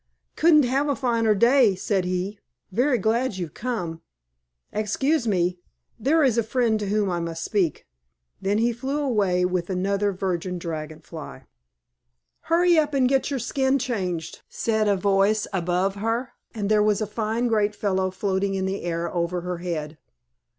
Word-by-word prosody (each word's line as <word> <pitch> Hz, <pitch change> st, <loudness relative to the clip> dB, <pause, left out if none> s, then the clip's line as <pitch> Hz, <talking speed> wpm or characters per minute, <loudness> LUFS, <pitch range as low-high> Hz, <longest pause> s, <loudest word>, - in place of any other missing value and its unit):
"Couldn't 310 Hz, -2 st, +5 dB
have 270 Hz, +4 st, +1 dB
a 285 Hz, -, +1 dB
finer 230 Hz, -5 st, +2 dB
day," 235 Hz, -1 st, +5 dB
said 190 Hz, 0 st, -1 dB
he. 185 Hz, +3 st, -2 dB, 0.3 s
"Very 250 Hz, +6 st, +2 dB
glad 225 Hz, +1 st, 0 dB
you've 175 Hz, -5 st, -5 dB
come. 180 Hz, -10 st, -4 dB, 0.7 s
Excuse 235 Hz, +6 st, 0 dB
me. 180 Hz, -3 st, +1 dB, 0.4 s
There 300 Hz, +7 st, +3 dB
is 240 Hz, -4 st, +3 dB
a -, -, +4 dB
friend 225 Hz, -1 st, +1 dB
to 205 Hz, -, -3 dB
whom 205 Hz, 0 st, +1 dB
I 175 Hz, -, -1 dB
must 165 Hz, -1 st, -4 dB
speak." 185 Hz, -8 st, 0 dB, 0.6 s
Then 200 Hz, +2 st, +1 dB
he 235 Hz, +2 st, +2 dB
flew 265 Hz, +5 st, -3 dB
away 200 Hz, -10 st, +1 dB
with 180 Hz, -1 st, -1 dB
another 200 Hz, +2 st, 0 dB
Virgin 180 Hz, -1 st, -2 dB
Dragon 160 Hz, -2 st, -6 dB
Fly. 150 Hz, -, -9 dB, 1.0 s
"Hurry 345 Hz, 0 st, +3 dB
up 300 Hz, -2 st, 0 dB
and 260 Hz, -2 st, +4 dB
get 270 Hz, +1 st, +1 dB
your 280 Hz, -, -1 dB
skin 265 Hz, +2 st, +1 dB
changed," 190 Hz, -, -3 dB
said 220 Hz, -2 st, 0 dB
a 200 Hz, -, +3 dB
voice 200 Hz, +2 st, +2 dB
above 180 Hz, +1 st, 0 dB
her, 225 Hz, +4 st, -1 dB, 0.2 s
and 210 Hz, -3 st, -3 dB
there 210 Hz, 0 st, +4 dB
was 210 Hz, 0 st, +2 dB
a -, -, +1 dB
fine 220 Hz, +3 st, -2 dB
great 210 Hz, -2 st, +1 dB
fellow 190 Hz, -2 st, 0 dB
floating 195 Hz, +1 st, -1 dB
in 190 Hz, 0 st, -1 dB
the 190 Hz, +1 st, -2 dB
air 170 Hz, 0 st, -3 dB
over 175 Hz, 0 st, -1 dB
her 180 Hz, 0 st, -4 dB
head. 155 Hz, -3 st, -4 dB
205 Hz, 165 wpm, -24 LUFS, 180-240 Hz, 1.0 s, Couldn't